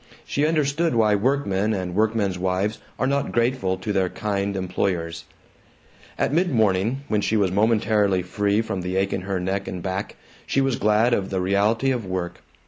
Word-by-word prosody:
She 145 Hz, +2 st, 0 dB
understood 155 Hz, -1 st, +1 dB
why 110 Hz, -2 st, +4 dB
workmen 105 Hz, -3 st, +1 dB
and 90 Hz, -2 st, -3 dB
workmen's 105 Hz, -2 st, +1 dB
wives 95 Hz, +4 st, -1 dB, 0.2 s
are -, -, 0 dB
not 140 Hz, +1 st, 0 dB
grateful 120 Hz, -6 st, +1 dB
to 105 Hz, +3 st, -3 dB
their 95 Hz, -2 st, +1 dB
kind 100 Hz, -1 st, -2 dB
employers. 85 Hz, -3 st, -2 dB, 0.9 s
At -, -, 0 dB
mid 175 Hz, +3 st, +2 dB
morning, 110 Hz, +3 st, +1 dB
when 105 Hz, -1 st, +1 dB
she 110 Hz, -, +1 dB
was 100 Hz, -3 st, +2 dB
momentarily 105 Hz, -2 st, +2 dB
free 100 Hz, +4 st, 0 dB
from 105 Hz, -4 st, -3 dB
the 90 Hz, +1 st, -3 dB
ache 95 Hz, +1 st, +1 dB
in -, -, -2 dB
her 95 Hz, 0 st, -2 dB
neck 95 Hz, +2 st, -2 dB
and 90 Hz, -2 st, -5 dB
back, 95 Hz, +1 st, -3 dB, 0.3 s
she -, -, +1 dB
was 135 Hz, -3 st, +1 dB
glad 110 Hz, +3 st, +3 dB
of 95 Hz, -4 st, 0 dB
the 95 Hz, -, -1 dB
reality 105 Hz, +7 st, +2 dB
of 125 Hz, -3 st, -1 dB
work. 90 Hz, -2 st, -4 dB
100 Hz, 180 wpm, -23 LUFS, 95-115 Hz, 0.9 s, why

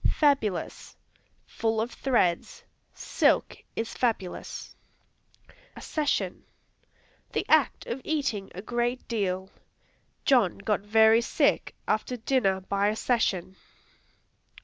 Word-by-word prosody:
Fabulous 270 Hz, -, 0 dB, 0.5 s
Full 225 Hz, -1 st, -1 dB
of 230 Hz, +2 st, -1 dB
threads; 185 Hz, -10 st, 0 dB, 0.3 s
"Silk -, -, +1 dB, 0.2 s
is 225 Hz, -, -3 dB
fabulous." 220 Hz, -7 st, -3 dB, 1.0 s
Accession 300 Hz, -2 st, -2 dB, 0.9 s
The -, -, -1 dB
act 310 Hz, -4 st, +3 dB
of 245 Hz, +3 st, -4 dB
eating 275 Hz, -11 st, -2 dB
a 190 Hz, -, -7 dB
great 240 Hz, +2 st, -2 dB
deal; 190 Hz, -4 st, -2 dB, 0.7 s
"John 245 Hz, -, +4 dB
got 200 Hz, 0 st, -1 dB
very 220 Hz, +2 st, +5 dB
sick -, -, +1 dB
after 220 Hz, +4 st, -1 dB
dinner 220 Hz, -6 st, +1 dB
by 200 Hz, +2 st, 0 dB
accession." 205 Hz, -4 st, 0 dB
220 Hz, 95 wpm, -27 LUFS, 195-245 Hz, 1.0 s, very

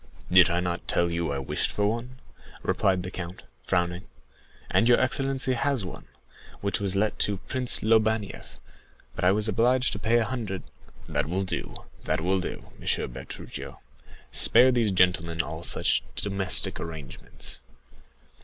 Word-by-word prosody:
"Did 90 Hz, -1 st, +7 dB
I 85 Hz, +1 st, +1 dB
not 85 Hz, -1 st, -3 dB
tell 85 Hz, 0 st, +1 dB
you 85 Hz, -3 st, -1 dB
I 70 Hz, -, -2 dB
wished 70 Hz, -, -1 dB
for 105 Hz, -, 0 dB
one?" 120 Hz, +4 st, -2 dB, 0.5 s
replied 95 Hz, -2 st, +1 dB
the 90 Hz, -, -6 dB
count, 90 Hz, -1 st, -7 dB, 0.2 s
frowning. 90 Hz, +2 st, 0 dB, 0.6 s
"And 115 Hz, -, +3 dB
your 120 Hz, -, +6 dB
excellency 135 Hz, 0 st, +1 dB
has 130 Hz, -3 st, 0 dB
one, -, -, -9 dB, 0.5 s
which 100 Hz, 0 st, -1 dB
was 100 Hz, -1 st, 0 dB
let 105 Hz, +2 st, 0 dB
to 100 Hz, -1 st, 0 dB
Prince 125 Hz, +5 st, -1 dB
Lobanieff; 110 Hz, -1 st, +1 dB, 0.6 s
but -, -, -4 dB
I 90 Hz, -, +5 dB
was 105 Hz, +2 st, +2 dB
obliged 120 Hz, +4 st, +2 dB
to 100 Hz, -, -5 dB
pay 115 Hz, +3 st, +2 dB
a 115 Hz, -, +2 dB
hundred——" 110 Hz, -7 st, -4 dB, 0.4 s
"That -, -, -1 dB
will 95 Hz, +3 st, 0 dB
do—that 80 Hz, -3 st, -4 dB
will 95 Hz, +4 st, +1 dB
do, 90 Hz, -, -6 dB
Monsieur -, -, 0 dB
Bertuccio; -, -, -8 dB, 0.5 s
spare 130 Hz, +1 st, +7 dB
these 115 Hz, -4 st, +2 dB
gentlemen 90 Hz, -3 st, +2 dB
all 80 Hz, +2 st, -6 dB
such -, -, +2 dB
domestic 100 Hz, -2 st, 0 dB
arrangements. 80 Hz, -5 st, -6 dB
100 Hz, 150 wpm, -27 LUFS, 90-115 Hz, 0.6 s, Did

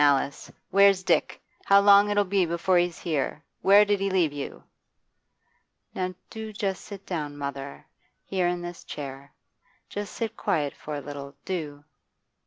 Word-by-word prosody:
Alice, 140 Hz, -1 st, +2 dB, 0.2 s
where's 195 Hz, -1 st, +5 dB
Dick? -, -, +1 dB, 0.3 s
How 200 Hz, 0 st, +7 dB
long'll 205 Hz, +1 st, +6 dB
it 205 Hz, -1 st, +3 dB
be 195 Hz, 0 st, +2 dB
before 170 Hz, +2 st, +2 dB
he's 175 Hz, -1 st, 0 dB
here? 155 Hz, -1 st, -2 dB, 0.2 s
Where 200 Hz, +2 st, +7 dB
did 205 Hz, -1 st, +1 dB
he 195 Hz, 0 st, 0 dB
leave 175 Hz, -6 st, +2 dB
you?' 145 Hz, -1 st, -6 dB, 1.3 s
'Now 185 Hz, 0 st, -3 dB, 0.2 s
do 220 Hz, -1 st, -6 dB
just 200 Hz, -3 st, -3 dB
sit 200 Hz, -2 st, -10 dB
down, 150 Hz, -5 st, -4 dB
mother; 140 Hz, -1 st, -6 dB, 0.4 s
here, 185 Hz, -2 st, 0 dB
in 175 Hz, 0 st, -2 dB
this 175 Hz, 0 st, -7 dB
chair. 140 Hz, -1 st, -8 dB, 0.6 s
Just 205 Hz, 0 st, -5 dB
sit 225 Hz, -1 st, -3 dB
quiet 145 Hz, -, 0 dB
for 150 Hz, -, -6 dB
a 145 Hz, -, -4 dB
little, 140 Hz, -1 st, -8 dB
do. 150 Hz, -6 st, -4 dB
180 Hz, 155 wpm, -26 LUFS, 145-200 Hz, 1.3 s, How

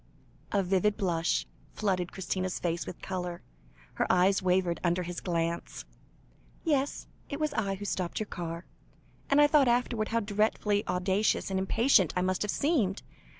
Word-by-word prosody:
A 200 Hz, -1 st, +2 dB
vivid 195 Hz, +3 st, +1 dB
blush 175 Hz, -3 st, 0 dB, 0.3 s
flooded 185 Hz, -4 st, 0 dB
Christina's 185 Hz, 0 st, -2 dB
face 170 Hz, -1 st, -2 dB
with 180 Hz, -, -8 dB
colour, 180 Hz, -2 st, -4 dB, 0.5 s
her -, -, 0 dB
eyes 185 Hz, +2 st, +4 dB
wavered 180 Hz, -2 st, +1 dB
under 175 Hz, +1 st, +1 dB
his 175 Hz, 0 st, -5 dB
glance. 170 Hz, -1 st, -2 dB, 0.8 s
"Yes, 285 Hz, -4 st, 0 dB, 0.2 s
it 285 Hz, -, -4 dB
was 305 Hz, -2 st, 0 dB
I 200 Hz, -6 st, -1 dB
who 205 Hz, +1 st, -7 dB
stopped 185 Hz, -3 st, -2 dB
your 215 Hz, -, -2 dB
car, 170 Hz, -3 st, -6 dB, 0.6 s
and 280 Hz, -, +4 dB
I 295 Hz, -, +8 dB
thought 290 Hz, -2 st, +4 dB
afterwards 240 Hz, -2 st, +1 dB
how 230 Hz, 0 st, +1 dB
dreadfully 210 Hz, 0 st, +1 dB
audacious 190 Hz, +3 st, +1 dB
and 190 Hz, -, +1 dB
impatient 200 Hz, -, +3 dB
I 180 Hz, -, +1 dB
must 185 Hz, 0 st, 0 dB
have 210 Hz, -, -1 dB
seemed. 230 Hz, -, +1 dB
190 Hz, 155 wpm, -29 LUFS, 180-215 Hz, 0.8 s, I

